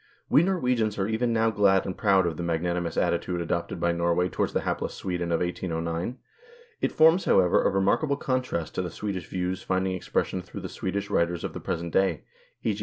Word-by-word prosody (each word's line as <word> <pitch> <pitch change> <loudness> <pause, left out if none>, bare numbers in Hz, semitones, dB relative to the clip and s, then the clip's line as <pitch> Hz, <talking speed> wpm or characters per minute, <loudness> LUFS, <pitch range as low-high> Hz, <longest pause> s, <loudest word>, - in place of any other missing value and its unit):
We 145 - +7
Norwegians 125 - +1
are 95 -1 0
even 115 +2 0
now 115 0 +2
glad 100 -3 +3
and 95 - -3
proud 100 -5 +3
of 85 -2 -1
the 85 - -5
magnanimous 85 0 -1
attitude 90 -1 0
adopted 85 0 -2
by 85 0 +2
Norway 85 +1 +1
towards - - -1
the - - 0
hapless - - -2
Sweden 90 -2 -3
of 85 - +1
1809; 85 +4 -2 0.6
it - - +1
forms, 160 +4 +5
however, 90 -2 +4
a - - +3
remarkable 100 +10 +1
contrast 130 - -2
to - - -1
the 90 - -3
Swedish 95 -2 -4
views 90 0 -2
finding 95 0 0
expression 95 0 -1
through 90 - -9
the - - -6
Swedish 100 +1 -3
writers 85 0 +1
of - - -4
the - - -5
present 85 0 -4
day; 95 0 +2 0.4
e.g. - - 0
95 Hz, 195 wpm, -27 LUFS, 85-105 Hz, 0.6 s, We